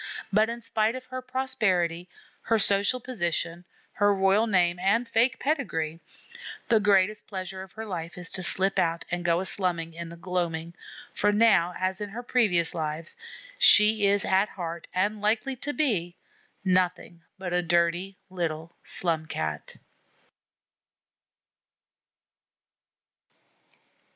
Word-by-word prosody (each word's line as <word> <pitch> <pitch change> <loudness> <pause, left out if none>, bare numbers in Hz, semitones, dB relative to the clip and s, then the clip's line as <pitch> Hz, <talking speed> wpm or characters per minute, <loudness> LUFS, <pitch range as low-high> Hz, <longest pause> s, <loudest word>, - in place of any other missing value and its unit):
But 215 +2 +4
in 235 0 -6
spite 225 0 0
of 255 0 -7
her 255 0 -6
prosperity, 190 -11 -1 0.3
her 225 - +1
social 200 +4 +4
position, 175 -7 -3 0.3
her 205 0 +3
royal 195 +3 +3
name 175 -4 +2
and 210 +6 +1
fake 230 +2 +2
pedigree, 165 - -2 0.7
the 225 -2 +5
greatest 205 0 +2
pleasure 190 -1 -6
of 190 -1 -11
her 220 0 -7
life 170 -4 -6
is 180 0 -6
to 190 - -3
slip 190 +2 +1
out 165 0 0
and 175 0 -2
go 170 -1 +2
a 190 - -3
slumming 170 -4 +1
in 170 0 -7
the 170 - -9
gloaming, 170 -2 -3 0.4
for 210 - +2
now, 205 -5 +3
as 185 +2 -2
in 205 - -4
her 235 +5 -7
previous 200 -10 +2
lives, 155 0 -4 0.4
she 210 -1 +6
is 200 0 +2
at 190 +2 +2
heart, 170 -2 -6
and 205 +3 -1
likely 220 +5 0
to 290 - -2
be, 205 - 0 0.5
nothing 180 -2 0 0.2
but 185 -2 -5
a 180 - +2
dirty 175 +3 0
little 165 -2 -3
Slum 160 -3 -2
Cat. 75 - -4
190 Hz, 135 wpm, -27 LUFS, 170-215 Hz, 0.7 s, she